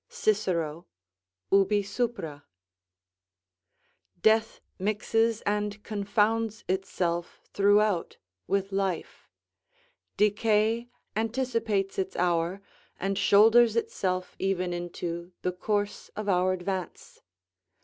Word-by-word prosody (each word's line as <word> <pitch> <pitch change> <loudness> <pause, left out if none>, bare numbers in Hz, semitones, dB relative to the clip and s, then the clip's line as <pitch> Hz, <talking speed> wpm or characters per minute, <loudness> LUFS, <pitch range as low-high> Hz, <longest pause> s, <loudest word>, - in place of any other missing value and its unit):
Cicero, 170 -6 -1 0.6
ubi 200 +1 +4
sup.] 235 +4 -2 2.0
Death 220 +3 +3 0.2
mixes 215 +3 +1
and 205 0 -2
confounds 215 +1 0
itself 180 -2 -2
throughout 205 -2 +3 0.3
with 195 0 0
life; 195 -3 -3 0.9
decay 215 +2 +2 0.3
anticipates 225 -4 -1
its 190 - -2
hour, 175 +2 0 0.4
and 195 +1 -1
shoulders 220 +3 +6
itself 185 -5 -1
even 185 -2 0
into 175 0 -5
the 180 - +1
course 205 +2 -2
of 215 0 -4
our 185 -1 +3
advance. 185 -1 -5
200 Hz, 85 wpm, -28 LUFS, 185-215 Hz, 2.0 s, shoulders